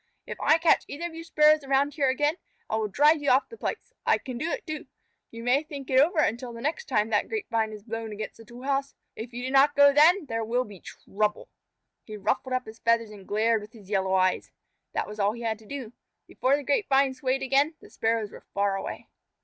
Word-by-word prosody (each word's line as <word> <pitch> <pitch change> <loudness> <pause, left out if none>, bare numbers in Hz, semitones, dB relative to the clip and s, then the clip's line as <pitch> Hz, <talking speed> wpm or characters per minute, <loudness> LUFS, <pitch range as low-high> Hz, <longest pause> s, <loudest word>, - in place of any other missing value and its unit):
If - - -7
I 315 - +5
catch 325 -1 +3
either 315 +4 -5
of 345 - -5
you 330 0 -7
Sparrows 305 -2 +4
around 275 +1 +1
here 280 -3 +1
again, 295 +5 +1 0.3
I - - -2
will 220 -1 0
drive 295 +8 +4
you 285 - +1
off 260 +2 +3
the 460 - -10
place. - - -5
I - - +3
can 255 - -7
do 320 - -2
it, - - -4
too. 310 -2 -6 0.4
You 230 0 -9
may 250 +4 +3
think 285 -4 -8
it 260 - +5
over 325 +6 +3
until 240 -3 0
the 230 - -8
next 315 - -2
time 210 - +1
that 210 - +1
grapevine 230 - -1
is 210 -1 -10
blown 225 0 -5
against 215 +1 -6
the 225 - -14
tool 240 +3 -12
house. 275 0 -1 0.2
If 230 +2 -7
you 245 +1 -6
do 260 - -3
not 275 +2 +5
go 285 0 +7
then, 320 +5 +5
there 225 -3 -3
will 240 +3 0
be 205 -5 -12
trouble." 210 +4 -3 0.5
He 215 -1 -8
ruffled 255 +5 -1
up 255 0 -1
his 220 +1 -11
feathers 230 -1 +1
and 200 -3 -13
glared 220 +1 +2
with 210 +1 -12
his 210 -3 -14
yellow 190 -1 +1
eyes. 185 -1 +1 0.4
That - - -1
was 210 +1 -9
all 200 +1 +2
he 235 +1 -8
had 220 -1 -2
to 220 - -17
do. 260 -4 -7 0.3
Before 270 +2 +1
the 290 - -6
grapevine 275 -3 +2
swayed 260 +1 -1
again, 275 +4 +2
the - - -16
Sparrows 225 -2 -1
were - - -14
far 200 -1 +1
away. 195 - -6
255 Hz, 240 wpm, -27 LUFS, 220-285 Hz, 0.5 s, go